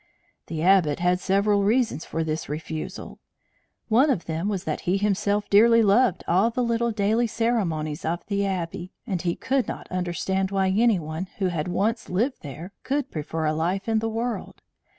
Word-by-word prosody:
The 160 -1 -3
Abbot 180 -5 +4
had 180 +1 +2
several 200 +2 +2
reasons 220 - +1
for 165 - -2
this 155 -1 -3
refusal; 155 +1 -6 0.7
one 245 +7 +4
of 225 -11 0
them 165 +5 -2
was 195 -3 -2
that - - -2
he 190 - +3
himself 205 0 0
dearly 230 +3 +6
loved 215 +1 +3
all 190 +6 +3
the 245 +2 -1
little 235 0 +1
daily 220 +2 +1
ceremonies 185 -10 -1
of 170 +2 -2
the 200 -1 -1
Abbey, 180 -1 -3
and 190 -8 -2
he 170 -2 -1
could 265 -2 0
not - - -6
understand 185 +1 -1
why 195 -1 +1
any 220 +2 +3
one 160 +3 -5
who 190 -2 +1
had 165 -2 -2
once 210 +6 -1
lived 235 +9 0
there 160 +7 -8
could 275 0 -2
prefer 160 +1 -3
a 155 - +1
life 180 +6 -1
in 225 -1 +2
the 225 +1 -1
world. 230 +2 -4
195 Hz, 180 wpm, -25 LUFS, 170-225 Hz, 0.7 s, dearly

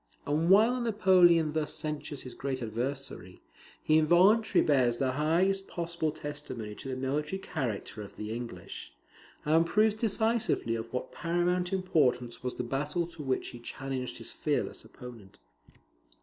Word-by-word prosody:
And 155 +4 +1
while 225 +6 +5
Napoleon 180 -8 +4
thus 155 -1 -1
censures 150 -2 -4
his 125 - -8
great 135 -1 -3
adversary, 120 -4 -4 0.4
he 155 0 +4
involuntarily 185 +6 +4
bears 125 -5 +3
the 130 0 +1
highest 175 +7 +1
possible 170 -2 -2
testimony 145 -8 -6
to 135 - -8
the 130 - -2
military 145 +7 -2
character 125 - -4
of 100 - -10
the 105 +1 -5
English, 120 0 -7 0.5
and 160 +2 +4
proves 210 +5 +3
decisively 220 - +1
of 115 0 -4
what 125 - -4
paramount 175 +1 0
importance 135 -11 +1
was 125 0 -3
the - - -3
battle 145 +7 -1
to 165 - -9
which 135 -2 -1
he 120 - -10
challenged 130 +1 -5
his - - -6
fearless - - -2
opponent. 115 -6 -12
150 Hz, 145 wpm, -30 LUFS, 125-175 Hz, 0.5 s, while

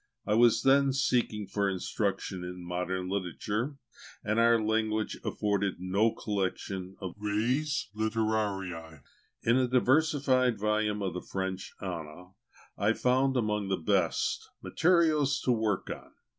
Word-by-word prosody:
I 105 - +1
was 115 0 +5
then 135 0 +4
seeking 120 -5 +1
for 100 +1 0
instruction 95 0 -2
in 90 0 -7
modern 90 +1 -2
literature; 105 - -2 0.5
and 110 +2 0
our 115 0 +5
language 110 0 0
afforded 100 -2 0
no 95 +5 +2
collection 95 -3 -3
of 95 -2 -5
the - - -20
res 135 +8 0
litterariæ. 100 - -2 0.4
In 115 +2 +4
the 130 -1 +2
diversified 130 -1 +3
volumes 105 0 0
of 95 -3 -2
the 90 - -4
French 95 0 -4
Ana, 90 -1 -6 0.5
I 105 +2 +3
found, 130 +2 +2
among 105 -3 0
the 95 -1 0
best, 90 0 0
materials 155 -5 +3
to 125 - +1
work 110 -4 0
on. - - -8
105 Hz, 130 wpm, -30 LUFS, 95-125 Hz, 0.5 s, was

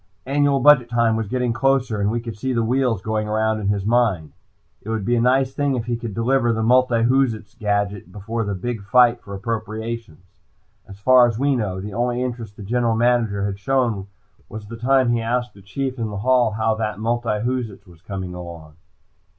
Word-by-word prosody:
Annual 140 0 +2
budget 135 -4 +6
time 115 -1 +2
was 110 -1 -2
getting 125 +1 -1
closer, 130 -4 +1
and 100 - +1
we 120 +2 -1
could 115 -2 -7
see 130 +5 -2
the 115 -1 +1
wheels 120 -4 0
going 110 -1 -1
around 110 0 0
in 100 - -3
his 100 -1 0
mind. 110 - +1 0.5
It 110 - -9
would 110 -3 -2
be 120 - +2
a 115 - +2
nice 130 +2 +2
thing 140 -1 0
if 115 -2 -3
he 120 0 -1
could 115 -3 -6
deliver 120 +1 +2
the 110 -1 -1
multiwhoozits 120 -2 +2
gadget 100 -2 -1
just 90 - -20
before 110 +4 -4
the 100 -1 -3
big 115 +3 -4
fight 120 +4 +4
for 100 - -8
appropriations. 110 -3 -5 0.6
As 95 - -11
far 125 +3 +6
as 115 -2 -3
we 140 +2 +2
knew, 100 -6 -2
the 105 +1 -7
only 120 +2 -1
interest 115 -4 -6
the 105 - -8
General 115 +2 0
Manager 115 -4 +1
had 100 -1 -4
shown 115 -5 0 0.4
was 110 0 -8
the 115 +3 -8
time 130 +2 +2
he 120 -1 +1
asked 120 +1 -2
the 100 - -16
Chief 130 +6 -4
in 115 -2 -2
the 100 - -5
hall 120 0 +2
how 110 +1 +1
that 110 -1 -3
multiwhoozits 115 -1 -2
was 85 -3 -18
coming 95 -2 -6
along. 85 -3 -10
115 Hz, 205 wpm, -21 LUFS, 105-125 Hz, 0.6 s, budget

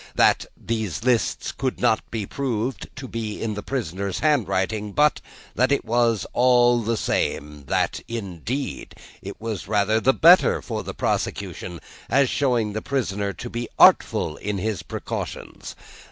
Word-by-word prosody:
That, - - +3
these 110 -4 -3
lists 125 -2 +1
could 130 -1 -3
not 115 -3 +3
be 110 -3 -3
proved 125 0 -3
to 135 -1 -7
be 110 -3 -4
in 110 -2 -2
the 105 - -5
prisoner's 100 -6 -3
handwriting; 105 - 0
but 150 0 +3 0.3
that 130 +2 +2
it 140 - +1
was 115 -2 +2
all 120 -1 +4
the 115 +1 -1
same; 75 -7 -2
that, - - 0
indeed, 115 - -5 0.3
it - - -8
was 110 -6 -5
rather 110 +1 +2
the 130 +4 +4
better 170 +6 +6
for - - -4
the - - -7
prosecution, 85 -2 -3 0.3
as 135 -1 +3
showing 120 -7 +1
the 110 - -3
prisoner 105 -7 -1
to 120 - -7
be 120 0 -4
artful 75 - +5
in 105 0 -3
his 105 -1 -2
precautions. - - -6
115 Hz, 150 wpm, -23 LUFS, 100-125 Hz, 0.3 s, better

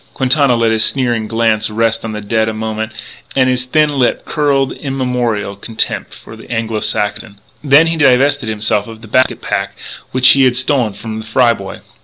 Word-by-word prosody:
Quintana 135 -1 +2
let 115 -1 +1
his 110 0 +2
sneering 120 -5 0
glance 115 -1 +1
rest 115 +1 0
on 110 - -4
the 105 0 -5
dead 110 +1 0
a 110 - -5
moment, 110 0 -4 0.4
and 130 -1 +3
his 125 0 -1
thin 150 +4 +2
lip 135 -4 0
curled 140 -3 0
immemorial 125 -7 -2
contempt 110 +3 -3
for 110 - -12
the 110 - -14
Anglo 115 -2 -2
Saxon. 105 0 -3 0.2
Then 145 +2 +5
he 165 0 -1
divested 140 -3 +3
himself 105 -1 -1
of 110 -1 -11
the - - -10
basket 130 +4 +1
pack - - -3 0.3
which 130 0 +5
he 135 -1 +6
had 125 -1 +2
stolen 130 -5 +1
from 110 +2 -7
the 110 - -8
Fry 120 +1 +3
boy. 95 -3 -9
115 Hz, 190 wpm, -15 LUFS, 110-130 Hz, 0.4 s, he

